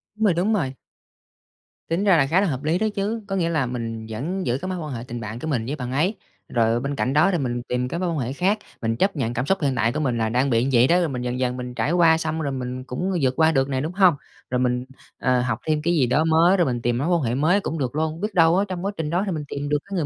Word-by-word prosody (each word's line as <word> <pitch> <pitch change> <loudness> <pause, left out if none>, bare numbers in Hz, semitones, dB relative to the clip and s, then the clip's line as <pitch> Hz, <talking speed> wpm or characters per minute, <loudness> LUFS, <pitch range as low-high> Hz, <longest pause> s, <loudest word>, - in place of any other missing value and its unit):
Đúng 220 - -3
rồi, 195 - +4
đúng 185 +6 +1
rồi. 135 -11 0 1.2
Tính 170 +4 0
ra 195 -5 +5
là 135 - +4
khá 180 +7 +3
là 200 - +2
hợp 135 -2 -3
lý 160 +3 +1
đó 220 +3 +1
chứ. 215 +3 -2
Có 195 - -2
nghĩa 170 -3 +1
là 155 -5 +1
mình 115 -2 -4
vẫn 170 - -3
giữ 120 +2 +1
cái 185 - -4
mối 185 - -3
quan 150 -4 -5
hệ 115 - -5
tình 120 0 -5
bạn 110 +1 -6
của 160 - -5
mình 125 -7 -1
với 140 +5 -3
bạn 125 -3 -5
ấy, 170 +10 +1 0.3
rồi 115 0 +2
bên 140 +2 -3
cạnh 130 0 -1
đó 155 +7 +4
thì 175 - +1
mình 120 -4 -2
tìm 125 0 -1
các 170 - -4
mối 180 - 0
quan 160 -3 -2
hệ 125 +2 -2
khác, 195 +7 +1 0.2
mình 115 0 0
chấp 195 - +1
nhận 120 -5 -1
cảm 125 +3 -1
xúc 195 0 0
hiện 135 -3 +1
tại 115 0 +1
của 150 - -2
mình 125 -6 0
là 110 -1 0
đang 130 +4 +1
bị 115 -1 +2
như 135 - 0
vậy 120 +2 +5
đó, 175 +2 +4
rồi 170 -3 0
mình 125 -2 -4
dần 125 0 -3
dần 125 0 -1
mình 125 0 -6
trải 120 +7 0
qua, 165 -2 +5
xong 160 0 -2
rồi 140 - -2
mình 130 -1 -4
cũng 175 +10 -3
vượt 130 -1 +2
qua 160 0 +5
được 135 -2 +1
nè, 130 -1 -1
đúng 160 +4 -3
hông? 185 -4 +5 0.3
Rồi 125 - 0
mình, 125 0 0 0.3
ờ, 125 -1 +2
học 120 -2 -1
thêm 155 -1 +1
cái 170 +3 +1
gì 135 -7 +3
đó 145 +6 +2
mới, 165 +4 +4
rồi 175 - +3
mình 120 -3 -1
tìm 120 0 0
mối 145 +6 -1
quan 175 -3 +2
hệ 120 -1 -1
mới 165 +8 +3
cũng 165 - -3
được 135 -2 -2
luôn, 160 +2 -2
biết 210 -1 -2
đâu 165 0 +5
á, 200 - +2
trong 185 0 -5
quá 200 - 0
trình 155 -2 -2
đó 180 +4 +1
thì 195 - -2
mình 155 -3 -3
tìm 145 0 -4
được 150 - +2
cái 195 0 -6
người 165 -5 0
145 Hz, 315 wpm, -23 LUFS, 125-175 Hz, 1.2 s, ra